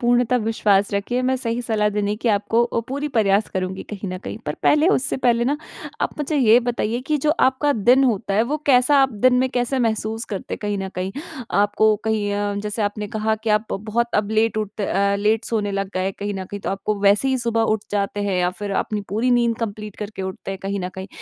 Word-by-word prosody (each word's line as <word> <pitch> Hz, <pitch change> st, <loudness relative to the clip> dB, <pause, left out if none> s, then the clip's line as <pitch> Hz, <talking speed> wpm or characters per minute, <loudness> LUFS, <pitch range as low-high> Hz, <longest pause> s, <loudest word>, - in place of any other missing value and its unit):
पूर्णतः 245 Hz, 0 st, +3 dB
विश्वास 210 Hz, -3 st, +1 dB
रखिए, 225 Hz, +5 st, -1 dB
मैं 260 Hz, +1 st, +1 dB
सही 240 Hz, -1 st, -2 dB
सलाह 215 Hz, -3 st, +1 dB
देने 205 Hz, 0 st, -1 dB
की 230 Hz, +2 st, -1 dB
आपको 215 Hz, +3 st, +2 dB
ओ -, -, +1 dB
पूरी 285 Hz, +3 st, -2 dB
प्रयास 210 Hz, -5 st, +2 dB
करुँगी 185 Hz, 0 st, -3 dB
कहीं 200 Hz, -1 st, -5 dB
न 185 Hz, 0 st, -4 dB
कहीं। -, -, -5 dB
पर -, -, -2 dB
पहले 300 Hz, +2 st, +4 dB
उससे 270 Hz, -9 st, +1 dB
पहले 235 Hz, -2 st, +2 dB
ना 285 Hz, +4 st, +1 dB, 0.5 s
आप -, -, +1 dB
मुझे 295 Hz, +1 st, -1 dB
ये 235 Hz, -4 st, +6 dB
बताइए 235 Hz, -1 st, -1 dB
कि 305 Hz, -, +2 dB
जो 300 Hz, +2 st, +1 dB, 0.2 s
आपका 275 Hz, +3 st, +1 dB
दिन 250 Hz, +4 st, +4 dB
होता 205 Hz, -5 st, 0 dB
है, 215 Hz, -, +4 dB
वो 280 Hz, +6 st, -1 dB
कैसा 265 Hz, +1 st, +5 dB
आप 265 Hz, -2 st, +1 dB
दिन 255 Hz, -1 st, +6 dB
में 260 Hz, +1 st, +2 dB
कैसे 250 Hz, +1 st, 0 dB
महसूस 225 Hz, -1 st, -1 dB
करते 200 Hz, -4 st, -5 dB
हैं -, -, -10 dB
कहीं 205 Hz, 0 st, -1 dB
न 195 Hz, -, -3 dB
कहीं? 185 Hz, +1 st, -3 dB, 0.4 s
आपको 205 Hz, +1 st, +3 dB
कहीं 215 Hz, -2 st, 0 dB
अ, 205 Hz, 0 st, -1 dB
जैसे 210 Hz, +1 st, -2 dB
आपने 205 Hz, 0 st, -2 dB
कहा 220 Hz, 0 st, +1 dB
कि 225 Hz, -, +1 dB
आप 215 Hz, +1 st, +1 dB
बहुत 220 Hz, +4 st, -1 dB, 0.2 s
लेट 220 Hz, 0 st, +2 dB
उठते 210 Hz, -1 st, -3 dB
अ, 200 Hz, +1 st, +1 dB
लेट 215 Hz, +2 st, +1 dB
सोने 210 Hz, -3 st, -1 dB
लग 195 Hz, 0 st, -2 dB
गए 185 Hz, -, 0 dB
हैं 195 Hz, -, -1 dB
कहीं 205 Hz, 0 st, -3 dB
न 190 Hz, -, -4 dB
कहीं। 205 Hz, +2 st, -7 dB
तो -, -, -3 dB
आपको 195 Hz, +2 st, -2 dB
वैसे 205 Hz, +6 st, +4 dB
ही 265 Hz, -1 st, +1 dB
सुबह 230 Hz, -1 st, 0 dB
उठ -, -, -15 dB
जाते 205 Hz, 0 st, -1 dB
हैं 200 Hz, -2 st, 0 dB
या 180 Hz, 0 st, +2 dB
फिर 205 Hz, -1 st, -4 dB
अपनी 210 Hz, -1 st, -3 dB
पूरी 225 Hz, +5 st, 0 dB
नींद 235 Hz, -2 st, +2 dB
कंप्लीट 210 Hz, -2 st, -5 dB
करके 210 Hz, -2 st, -6 dB
उठते 190 Hz, 0 st, -6 dB
हैं 195 Hz, -, -5 dB
कहीं 195 Hz, 0 st, -2 dB
न 180 Hz, -, -3 dB
कहीं? 190 Hz, 0 st, -6 dB
215 Hz, 235 wpm, -22 LUFS, 200-240 Hz, 0.5 s, ये